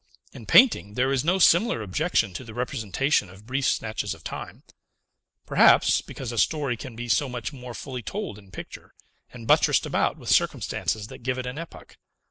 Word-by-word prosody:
In -, -, -11 dB
painting 220 Hz, -, +5 dB
there 130 Hz, +2 st, +1 dB
is 135 Hz, -1 st, +1 dB
no 180 Hz, +4 st, +2 dB
similar 175 Hz, -, +4 dB
objection 115 Hz, -, 0 dB
to 90 Hz, -, -6 dB
the 110 Hz, -3 st, -11 dB
representation 120 Hz, -1 st, 0 dB
of 95 Hz, +3 st, -15 dB
brief 130 Hz, +2 st, -1 dB
snatches 110 Hz, -2 st, -2 dB
of 80 Hz, -, -18 dB
time, -, -, -8 dB, 0.8 s
perhaps -, -, +5 dB
because 125 Hz, -3 st, -7 dB
a 115 Hz, -, -2 dB
story 145 Hz, -3 st, +1 dB
can 120 Hz, +1 st, -9 dB
be 120 Hz, +1 st, -6 dB
so 135 Hz, +4 st, +1 dB
much 125 Hz, +2 st, -5 dB
more 125 Hz, -3 st, -9 dB
fully 130 Hz, -3 st, -6 dB
told 185 Hz, -, -5 dB
in 100 Hz, -2 st, -18 dB
picture, 100 Hz, -, -10 dB, 0.4 s
and 120 Hz, -2 st, -10 dB
buttressed -, -, +3 dB
about -, -, 0 dB
with -, -, -8 dB
circumstances 110 Hz, -2 st, 0 dB
that -, -, -10 dB
give 130 Hz, +1 st, -2 dB
it 130 Hz, -, -4 dB
an 125 Hz, +4 st, -5 dB
epoch. 165 Hz, -, -11 dB
125 Hz, 185 wpm, -25 LUFS, 110-140 Hz, 0.8 s, painting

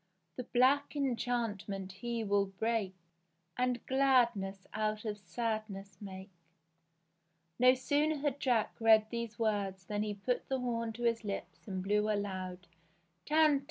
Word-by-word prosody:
The 250 Hz, -, -5 dB
black 270 Hz, +5 st, +3 dB
enchantment 230 Hz, -7 st, -1 dB
he 230 Hz, +4 st, -3 dB
will 200 Hz, -1 st, +2 dB
break, 195 Hz, 0 st, -1 dB, 0.6 s
And 250 Hz, -1 st, 0 dB
gladness 235 Hz, -8 st, +2 dB
out 215 Hz, 0 st, -1 dB
of 210 Hz, -1 st, -3 dB
sadness 200 Hz, -1 st, -4 dB
make." 190 Hz, -1 st, -8 dB, 1.3 s
No 255 Hz, +1 st, +7 dB
sooner 290 Hz, +4 st, +1 dB
had 285 Hz, -1 st, -1 dB
Jack 240 Hz, -6 st, +1 dB
read 220 Hz, -1 st, +6 dB
these 235 Hz, -2 st, -4 dB
words 200 Hz, -4 st, -1 dB
than 205 Hz, +1 st, -2 dB
he 210 Hz, -1 st, -2 dB
put 245 Hz, +5 st, -2 dB
the 265 Hz, -1 st, 0 dB
horn 230 Hz, -2 st, -1 dB
to 240 Hz, +2 st, -7 dB
his 230 Hz, -1 st, +1 dB
lips 200 Hz, +1 st, -6 dB
and 190 Hz, -2 st, -3 dB
blew 210 Hz, +2 st, +2 dB
a 210 Hz, -, +2 dB
loud 185 Hz, -2 st, -4 dB, 0.6 s
Tantivy 305 Hz, -2 st, +5 dB
220 Hz, 140 wpm, -33 LUFS, 200-245 Hz, 1.3 s, No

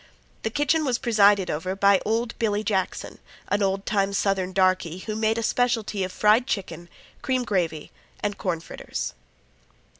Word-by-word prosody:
The 220 Hz, -, -1 dB
kitchen 295 Hz, +5 st, +1 dB
was 255 Hz, -5 st, +1 dB
presided 205 Hz, -5 st, +3 dB
over 185 Hz, +5 st, -3 dB
by 200 Hz, 0 st, +4 dB
old 230 Hz, +2 st, 0 dB
Billy 210 Hz, -2 st, 0 dB
Jackson, 195 Hz, -3 st, -2 dB, 0.3 s
an 205 Hz, -, +1 dB
old 195 Hz, 0 st, 0 dB
time 200 Hz, -1 st, +1 dB
Southern 195 Hz, -2 st, 0 dB
darkey, 185 Hz, -2 st, +1 dB
who 215 Hz, -, -4 dB
made 220 Hz, +1 st, +1 dB
a 230 Hz, -, -1 dB
specialty 225 Hz, -5 st, 0 dB
of 185 Hz, -, -3 dB
fried 215 Hz, +6 st, +3 dB
chicken, 175 Hz, -4 st, -4 dB, 0.3 s
cream 255 Hz, -1 st, 0 dB
gravy, 170 Hz, -8 st, -2 dB, 0.3 s
and 205 Hz, -1 st, -2 dB
corn 170 Hz, -4 st, -2 dB
fritters. -, -, -5 dB
200 Hz, 155 wpm, -25 LUFS, 185-225 Hz, 0.3 s, by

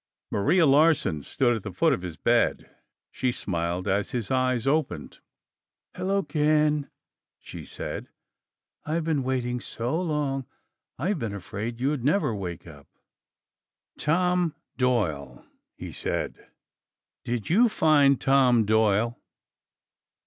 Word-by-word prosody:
Maria 165 Hz, -, +3 dB
Larsen 145 Hz, -, +3 dB
stood 120 Hz, -, +1 dB
at 110 Hz, -, -4 dB
the 100 Hz, -, -6 dB
foot 90 Hz, -, +2 dB
of -, -, -2 dB
his 90 Hz, -3 st, -7 dB
bed. -, -, +1 dB, 0.4 s
She 130 Hz, -1 st, -1 dB
smiled 85 Hz, -3 st, -3 dB
as 100 Hz, +1 st, 0 dB
his 115 Hz, -5 st, -3 dB
eyes 130 Hz, -2 st, +1 dB
opened. 135 Hz, -, -1 dB, 0.8 s
"Hello, 195 Hz, +1 st, 0 dB
Ken," 150 Hz, -2 st, +1 dB, 0.5 s
she -, -, -10 dB
said. -, -, -6 dB, 0.7 s
"I've 160 Hz, +2 st, -1 dB
been 155 Hz, -3 st, 0 dB
waiting 125 Hz, -1 st, -1 dB
so 125 Hz, +7 st, -3 dB
long. 145 Hz, -6 st, -2 dB, 0.5 s
I've 175 Hz, -, -1 dB
been 110 Hz, -5 st, -3 dB
afraid 105 Hz, +5 st, -5 dB
you'd 135 Hz, 0 st, -1 dB
never 150 Hz, -, +2 dB
wake 90 Hz, -5 st, -6 dB
up." 75 Hz, -4 st, -13 dB, 1.1 s
"Tom 180 Hz, +1 st, +1 dB, 0.2 s
Doyle," 85 Hz, -, -1 dB, 0.3 s
he -, -, -8 dB
said. -, -, -4 dB, 0.8 s
"Did 120 Hz, +2 st, -3 dB
you 230 Hz, +6 st, +5 dB
find 145 Hz, -, +4 dB
Tom 130 Hz, -4 st, +4 dB
Doyle?" 110 Hz, +2 st, +2 dB
130 Hz, 120 wpm, -26 LUFS, 105-150 Hz, 1.1 s, you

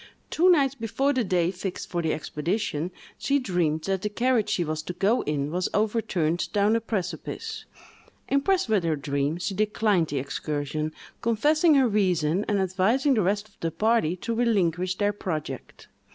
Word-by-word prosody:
Two 355 Hz, +3 st, +4 dB
nights 280 Hz, -7 st, +4 dB
before 270 Hz, +3 st, 0 dB
the 255 Hz, -2 st, +1 dB
day 180 Hz, -3 st, +1 dB
fixed 185 Hz, 0 st, -5 dB
for 175 Hz, -, -2 dB
the 160 Hz, -1 st, 0 dB
expedition, 160 Hz, +2 st, -2 dB, 0.3 s
she 280 Hz, -, +2 dB
dreamed 175 Hz, -, 0 dB
that 195 Hz, -1 st, -1 dB
the 210 Hz, -, -1 dB
carriage 235 Hz, +1 st, +1 dB
she 175 Hz, -, +1 dB
was 155 Hz, -1 st, -3 dB
to 180 Hz, -, -6 dB
go 210 Hz, +7 st, +2 dB
in 145 Hz, -1 st, -1 dB
was 180 Hz, +2 st, -1 dB
overturned 205 Hz, -7 st, 0 dB
down 205 Hz, +2 st, +3 dB
a 230 Hz, -, +1 dB
precipice. 230 Hz, -, -4 dB, 0.6 s
Impressed 355 Hz, +7 st, +2 dB
with 215 Hz, -5 st, +2 dB
her 165 Hz, -2 st, +1 dB
dream, 140 Hz, +2 st, -1 dB
she 190 Hz, +3 st, -3 dB
declined 210 Hz, -3 st, +1 dB
the 145 Hz, -, -3 dB
excursion, 145 Hz, +2 st, -3 dB, 0.3 s
confessing 300 Hz, +8 st, +3 dB
her 265 Hz, -2 st, +5 dB
reason, 185 Hz, -4 st, +1 dB
and 205 Hz, -, +1 dB
advising 195 Hz, +10 st, +2 dB
the 220 Hz, -, +2 dB
rest 205 Hz, +3 st, 0 dB
of 200 Hz, -, -29 dB
the 165 Hz, -, -1 dB
party 180 Hz, 0 st, +1 dB
to 230 Hz, +6 st, -4 dB
relinquish 185 Hz, -6 st, +1 dB
their 205 Hz, +1 st, +1 dB
project. 165 Hz, -7 st, -5 dB
195 Hz, 170 wpm, -26 LUFS, 165-230 Hz, 0.6 s, her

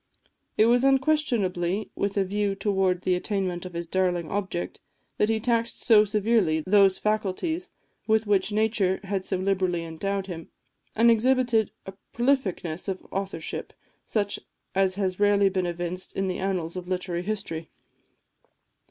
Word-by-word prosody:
It 215 Hz, -, +6 dB
was 240 Hz, +2 st, +4 dB
unquestionably 240 Hz, -, +1 dB
with 200 Hz, 0 st, -2 dB
a 200 Hz, -, +4 dB
view 200 Hz, +1 st, -1 dB
towards 190 Hz, -2 st, 0 dB
the 185 Hz, -, +3 dB
attainment 185 Hz, -1 st, -2 dB
of 180 Hz, -, -12 dB
his 170 Hz, 0 st, -3 dB
darling 175 Hz, -1 st, 0 dB
object, 190 Hz, -, -3 dB, 0.4 s
that 210 Hz, -, +3 dB
he 220 Hz, 0 st, +1 dB
taxed 230 Hz, 0 st, 0 dB
so 215 Hz, -2 st, +6 dB
severely 210 Hz, -6 st, +2 dB
those 195 Hz, -1 st, +5 dB
faculties 215 Hz, -, -1 dB, 0.4 s
with 220 Hz, 0 st, +3 dB
which 200 Hz, -1 st, +2 dB
nature 210 Hz, -3 st, +1 dB
had 195 Hz, -1 st, -2 dB
so -, -, -1 dB
liberally 185 Hz, -2 st, 0 dB
endowed 195 Hz, +4 st, -3 dB
him, 170 Hz, -4 st, -7 dB, 0.5 s
and 235 Hz, +2 st, +6 dB
exhibited 240 Hz, -2 st, +3 dB, 0.2 s
a 190 Hz, -, -7 dB, 0.2 s
prolificness 215 Hz, -, 0 dB
of 190 Hz, -1 st, -4 dB
authorship, 195 Hz, -4 st, -4 dB, 0.3 s
such 205 Hz, -2 st, -1 dB, 0.3 s
as 190 Hz, -1 st, +2 dB
has 190 Hz, -2 st, -1 dB
rarely 205 Hz, -1 st, +4 dB
been 185 Hz, -2 st, -1 dB
evinced 175 Hz, +1 st, -5 dB
in 195 Hz, 0 st, 0 dB
the 185 Hz, -, -2 dB
annals 185 Hz, -3 st, -2 dB
of 180 Hz, -1 st, -6 dB
literary 180 Hz, -1 st, -2 dB
history. 180 Hz, -5 st, -4 dB
195 Hz, 145 wpm, -26 LUFS, 180-215 Hz, 0.5 s, It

